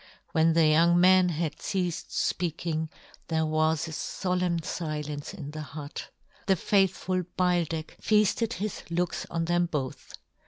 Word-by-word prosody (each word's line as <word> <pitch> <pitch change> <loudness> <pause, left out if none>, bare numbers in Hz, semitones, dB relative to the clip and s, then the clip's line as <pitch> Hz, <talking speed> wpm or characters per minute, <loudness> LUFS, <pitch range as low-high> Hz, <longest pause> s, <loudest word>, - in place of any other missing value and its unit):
When 160 0 +4
the 165 -1 +5
young 170 +3 +5
man 185 0 +6
had 165 -1 -2
ceafed 180 -4 -2
fpeaking, 160 -2 -1 0.4
there 160 -1 +1
was 155 0 +1
a - - -6
folemn 180 +1 -1
filence 150 -3 -4
in 155 -8 -7
the 155 0 -6
hut. 145 0 -7 0.4
The 190 - +5
faithful 190 0 +1 0.2
Beildech 170 -3 0
feafted 215 +2 +2
his 210 +1 -4
looks 175 +1 -1
on 165 0 -1
them 175 +1 +2
both. 140 -6 -4
170 Hz, 135 wpm, -28 LUFS, 155-180 Hz, 0.4 s, man